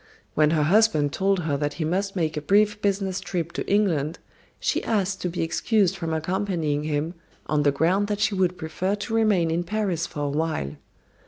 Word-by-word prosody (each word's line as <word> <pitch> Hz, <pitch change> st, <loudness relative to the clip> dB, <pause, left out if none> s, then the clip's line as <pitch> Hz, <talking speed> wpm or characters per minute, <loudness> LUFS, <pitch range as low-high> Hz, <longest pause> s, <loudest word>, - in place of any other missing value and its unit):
When 150 Hz, -1 st, +4 dB
her 155 Hz, -1 st, +2 dB
husband 155 Hz, -5 st, +3 dB
told 195 Hz, 0 st, +1 dB
her 150 Hz, -4 st, -1 dB
that 145 Hz, 0 st, -1 dB
he 160 Hz, -, -3 dB
must 195 Hz, +5 st, -1 dB
make 160 Hz, -4 st, 0 dB
a 150 Hz, -, -2 dB
brief 210 Hz, +5 st, +3 dB
business 195 Hz, -2 st, 0 dB
trip 170 Hz, -3 st, -3 dB
to -, -, -4 dB
England 170 Hz, -7 st, +1 dB, 0.4 s
she -, -, 0 dB
asked 200 Hz, -3 st, 0 dB
to 180 Hz, -, -1 dB
be 175 Hz, -, -2 dB
excused 195 Hz, +3 st, +1 dB
from 165 Hz, -4 st, -4 dB
accompanying 160 Hz, -3 st, -1 dB
him 155 Hz, +2 st, -1 dB, 0.3 s
on 150 Hz, -1 st, +1 dB
the 145 Hz, -1 st, +3 dB
ground 180 Hz, +8 st, +2 dB
that 205 Hz, -1 st, -2 dB
she 215 Hz, -, +2 dB
would 185 Hz, -2 st, +1 dB
prefer 180 Hz, +4 st, -2 dB
to 210 Hz, +2 st, -5 dB
remain 205 Hz, -7 st, +3 dB
in 170 Hz, +2 st, 0 dB
Paris 185 Hz, -3 st, -1 dB
for 145 Hz, -, -6 dB
a 145 Hz, -, 0 dB
while. 150 Hz, -, -1 dB
175 Hz, 195 wpm, -25 LUFS, 155-200 Hz, 0.4 s, When